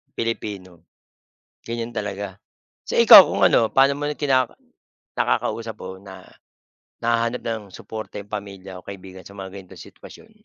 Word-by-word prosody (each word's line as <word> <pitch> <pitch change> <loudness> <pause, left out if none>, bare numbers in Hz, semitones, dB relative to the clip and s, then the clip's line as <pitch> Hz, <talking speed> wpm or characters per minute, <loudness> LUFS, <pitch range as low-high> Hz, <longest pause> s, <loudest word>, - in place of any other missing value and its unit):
Pilipino, 95 -7 -5 0.8
ganiyan 115 0 -5
talaga. 100 -2 -4 0.5
So - - -1
ikaw - - +11
kung - - +2
ano, 115 - +3
paano 135 +1 +4
mo 145 +1 -5
rin 150 - -6
kinaka 130 -4 +1 0.6
nakakausap 110 - -1
o 95 0 -8
na 95 -1 -12 0.8
nahahanap 115 +1 0
ng 115 -2 -2
suporta 110 +2 -8
'yong 100 +1 -10
pamilya 95 -2 -7
o - - -39
kaibigan 95 -1 -10
sa 100 0 -14
mga 95 0 -8
ganitong 95 -2 -11
sitwasyon? 220 - -15
100 Hz, 145 wpm, -22 LUFS, 95-115 Hz, 0.8 s, ikaw